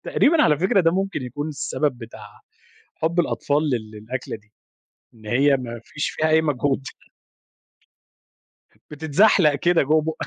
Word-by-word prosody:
تقريبًا 315 +2 +3
على 150 -3 +3
فكرة 190 +3 +2
ده 165 -2 +3
ممكن 190 -4 -2
يكون 145 +5 -5
السبب 145 -2 -2
بتاع 110 -3 -12 0.6
حُب 165 +2 -1
الأطفال 150 -2 0
لل 110 -5 -3
للأكلة 110 +4 -6
دي، 105 0 -29 0.6
إن 110 -2 -17
هي 135 +6 +3
ما 120 -3 -7
فيش 145 - -4
فيها 155 - -1
أي 160 0 +4
مجهود. 145 -2 0 2.1
بتتزحلق 160 +2 +3
كده 170 +4 +2
جوّا 155 +3 +2
بُقّك، 160 +1 -4
145 Hz, 140 wpm, -22 LUFS, 125-160 Hz, 2.1 s, أي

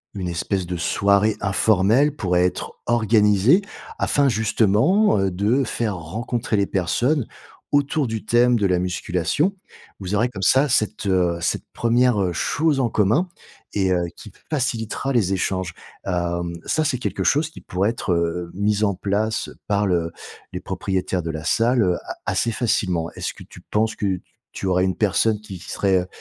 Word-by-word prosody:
une 95 -3 -3
espèce 90 +2 -2
de 90 +1 -4
soirée 100 +5 +2
informelle 110 +8 +3
pourrait 90 -5 +1
être 90 - -3
organisée 110 - +4 0.4
afin 145 -1 +2
justement, 110 - +3
heu, 95 -1 +1
de 105 +9 +1
faire 115 -4 -2
rencontrer 110 +7 -3
les 100 - +2
personnes 120 - 0 0.4
autour 145 0 +1
du 110 -1 -4
thème 120 +2 +4
de 105 - +1
la 90 -1 +1
musculation. 90 - 0 0.5
Vous 95 +1 -3
aurez 115 +4 +2
comme 100 -6 -8
ça 135 +10 +4
cette, 110 -3 0
heu, 90 -3 +2
cette 85 - -1
1re 115 -6 +2
chose 145 - +1
en 125 -3 +1
commun 110 - +2 0.5
et 95 -2 +1
heu, 90 -1 +1
qui - - -12 0.2
facilitera 130 -2 -2
les 100 -6 +2
échanges. 95 -2 -2 0.3
Hem, 85 -2 -2
ça 155 - +1
c'est 140 -4 0
quelque - - -2
chose 150 +3 +2
qui - - -12
pourrait 95 +3 0
être, 110 -5 -2
heu, 85 0 -1
mis 105 +2 0
en 100 - +1
place 105 +4 -1 0.2
par 100 0 +1
le 85 -3 0 0.4
les 90 - -4
propriétaires 95 -1 -2
de 80 - -3
la 80 -1 -6
salle 115 -3 +2
a - - -6
assez 115 - 0
facilement. 90 -8 0
Est-ce - - -4
que - - -12
tu - - -14
penses 110 +1 -1
que 105 - -3
t - - -14 0.3
tu - - -4
aurais 90 0 +2
une 95 -1 -1
personne 105 +2 +1
qui 95 -4 -9
qui 90 - -12
serait, 95 -2 +2
heu, 90 - -7
100 Hz, 170 wpm, -22 LUFS, 90-120 Hz, 0.5 s, organisée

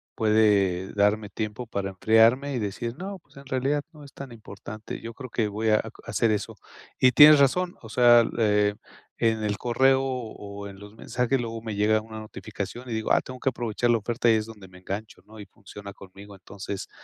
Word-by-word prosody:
puede 100 -4 +2
darme 105 +1 +1
tiempo 110 +3 -5
para 100 -3 -3
enfriarme 115 +8 +3
y 125 - -1
decir: 115 +3 -4
"No, 195 +1 -6
pues, 160 - -24
en 140 - -12
realidad 135 +2 -1
no 155 -3 -14
es 140 - -13
tan 135 -2 -9
importante". 110 -1 -9
Yo 115 0 -7
creo 130 +2 -9
que 115 -2 -1
voy 110 +2 -1
a 110 - +5
a - - 0 0.2
hacer 115 - +1
eso, 105 -1 -3 0.4
y 130 0 +5
tienes 150 +3 +8
razón, 175 +6 +2
o 110 - -10
sea, 120 0 +5
eh, 105 -2 +2 0.5
en 110 -1 +1
el 105 -1 -1
correo 130 +2 +2
o 110 -6 -6
en 100 -1 -12
los 105 +1 -13
mensajes, 125 +3 -1
luego 115 -1 -5
me 110 -2 -5
llega 110 +1 +2
una 110 0 -9
notificación 110 +3 -7
y - - -3
digo 110 -1 -2
"Ah, - - +4
tengo 130 0 -10
que 135 - +1
aprovechar 120 -1 -2
la 120 - +4
oferta" 120 +3 0
y - - +6
es 110 - -1
donde 105 -4 -12
me 90 0 -16
engancho, 100 +4 -7
¿no? 110 0 -14
Y 105 - -8
funciona 100 +1 -12
conmigo, 100 +1 -13
entonces, 95 +1 -8
110 Hz, 210 wpm, -25 LUFS, 105-125 Hz, 0.5 s, tienes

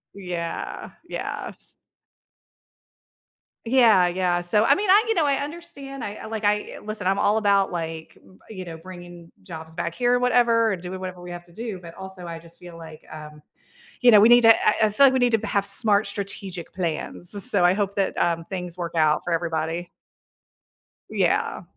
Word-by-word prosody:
Yeah, 175 -4 -6 0.2
yes. - - -4 1.8
Yeah, 225 -7 +4
yeah. 175 0 -1
So, 210 +5 +2
I - - +4
mean, 405 -1 -3
I, 410 +3 +6
you 450 - +1
know 330 -7 +1
I 280 -1 +2
understand. 285 -3 -7
I 205 - -5
I, - - -7
like 220 -1 -6
I 210 0 -1
listen, 210 -2 -2
I'm 195 +1 +1
all 210 +2 +2
about, 200 -2 +2
like, 165 -2 -6 0.3
you 185 -4 -8
know, 165 -2 -8
bringing 175 -1 -12
jobs 160 -4 -10
back 170 0 -4
here 245 0 +1
or 245 - +2
whatever 235 -3 +2
and 180 - -6
doing 185 +1 -7
whatever 185 -1 -7
we 175 0 -9
have 175 0 -9
to 170 - -20
do, 220 -1 -6
but 170 -1 -11
also, 190 -2 -9
I 165 -1 -7
just 170 0 -16
feel 175 -1 -12
like, 160 -1 -12
um, 150 -1 -11 0.6
you 245 - +6
know, 215 -3 +8
we 220 +3 +6
need 240 0 +7
to 225 -1 +7
I 215 +1 +3
I - - +1
feel 245 +7 +4
like 265 - +5
we 260 - +1
need 245 -1 +2
to 225 - +5
b 220 - -6
have 200 - 0
smart 205 +1 +3
strategic 195 -3 -5
plans. 175 +1 -4
S 200 - +8
so 200 -4 +3
I 175 +1 +5
hope 200 -1 -2
that, 195 -1 -1
um, 165 -1 0
things 180 -1 -5
work 170 -1 -5
out 155 -2 +2
for 175 - -4
everybody. 165 +1 -3 1.2
Yeah. - - -1
190 Hz, 200 wpm, -23 LUFS, 170-220 Hz, 1.8 s, know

